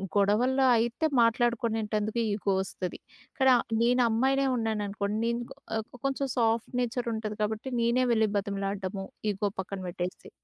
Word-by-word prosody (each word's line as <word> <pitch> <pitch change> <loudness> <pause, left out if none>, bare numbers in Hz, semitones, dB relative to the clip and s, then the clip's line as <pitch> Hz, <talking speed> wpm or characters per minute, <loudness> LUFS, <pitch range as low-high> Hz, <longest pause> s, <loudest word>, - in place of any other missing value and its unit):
గొడవల్లో 240 +7 +3
అయితే 235 +7 0 0.2
మాట్లాడుకొనేటందుకు 225 -2 +1
ఈగో 205 -1 0
వస్తది. 190 -1 -5 0.3
ఇక్కడ 265 -3 +3 0.3
నేనమ్మాయినే 250 +3 +3
ఉన్నాననుకోండి, 210 -2 -2
నేను 235 0 0 0.4
ఆహ్, 220 -1 -2 0.2
కొంచెం 275 0 0
సాఫ్ట్ 230 -1 +1
నేచర్ 245 0 -2
ఉంటది 215 -1 -4
కాబట్టి 215 +4 -3
నేనే 240 +2 +3
వెళ్లి 220 -1 +3
బతిమలాడడము, 195 -1 -3 0.3
ఈగో 205 +1 -1
పక్కన 195 +1 -6
పెట్టేసి. 180 +1 -5
220 Hz, 120 wpm, -28 LUFS, 205-240 Hz, 0.4 s, గొడవల్లో